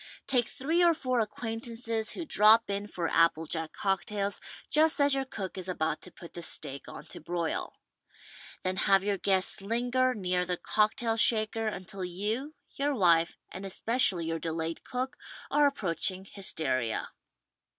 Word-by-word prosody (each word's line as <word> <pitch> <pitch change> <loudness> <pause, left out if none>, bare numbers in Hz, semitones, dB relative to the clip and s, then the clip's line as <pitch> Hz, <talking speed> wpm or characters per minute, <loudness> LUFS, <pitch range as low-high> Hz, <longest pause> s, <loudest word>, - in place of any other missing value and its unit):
Take 250 -4 +1
three 315 +6 0
or 340 -1 +5
four 255 -4 -1
acquaintances 225 0 -1
who 340 - -5
drop 220 -3 +5
in 200 +1 -3
for 175 -4 -3
apple 165 -1 +3
jack 160 0 -3
cocktails 200 +1 -1 0.3
just 310 +1 +4
as 285 0 +5
your 270 0 0
cook 195 -7 -6
is 185 - -5
about 160 -4 -2
to 180 - -11
put 170 - -13
the 170 - -7
steak 140 -4 -3
on - - -9
to - - -9
broil. 170 0 -3 0.9
Then 185 0 -1
have 195 0 +3
your 200 -1 -1
guests 190 -1 +3
linger 245 +4 +1
near 180 -3 0
the 180 0 -2
cock 215 +4 +1
tail 230 -3 -1
shaker 225 0 +2
until 190 -2 -5
you, 215 - -3 0.2
your 285 +1 -1
wife 170 -5 +3
and 190 - -7
especially 195 -2 +3
your 165 0 -2
de 165 - -3
layed 165 0 -4
cook 260 +3 -4 0.3
are 295 0 +5
approaching 190 - -2
hysteria. 155 - -1
200 Hz, 160 wpm, -29 LUFS, 180-240 Hz, 0.9 s, or